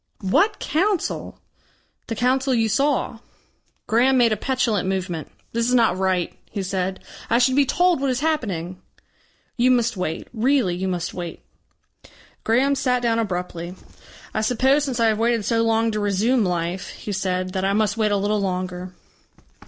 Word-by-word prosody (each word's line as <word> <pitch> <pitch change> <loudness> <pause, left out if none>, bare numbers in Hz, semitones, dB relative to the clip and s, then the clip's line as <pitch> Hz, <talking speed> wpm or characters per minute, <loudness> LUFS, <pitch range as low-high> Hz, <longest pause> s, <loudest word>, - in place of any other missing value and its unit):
"What 400 - +2
council?" 360 +6 -1 0.7
"The 225 - -3
Council 260 +3 +1
you 225 -1 +2
saw." 275 -1 0 0.7
Graham 255 +4 +3
made 240 -2 +4
a - - +2
petulant 225 -5 0
movement. 180 -4 -3 0.2
"This 235 +1 0
is 250 - +3
not 230 -6 +4
right," 185 -2 0 0.2
he 200 -2 -4
said. 190 0 -3 0.3
"I 230 - +4
should 255 +1 +3
be 280 -1 +4
told 355 -2 +2
what 275 - +1
is 255 0 -1
happening." 185 - -2 0.8
"You 250 +1 +4
must 240 -2 +2
wait. 165 -3 -3
Really 240 -4 +2
you 190 +2 -2
must 180 -2 -3
wait." 175 -2 -6 1.0
Graham 255 +5 +3
sat 250 -2 0
down 230 -1 +2
abruptly. 180 -4 -4 0.6
"I 215 - 0
suppose 265 +6 +2
since 255 -4 -3
I 230 - +4
have 220 -1 +2
waited 230 -2 +1
so 230 -1 +2
long 225 0 +2
to 215 - -2
resume 210 +4 +2
life," 175 0 -2
he 210 - -7
said, 185 -1 -2
"that 190 -1 -1
I 195 +1 +1
must 210 0 +1
wait 215 -2 +1
a 205 - +2
little 205 +1 0
longer." 185 -1 -3
220 Hz, 170 wpm, -22 LUFS, 185-250 Hz, 1.0 s, made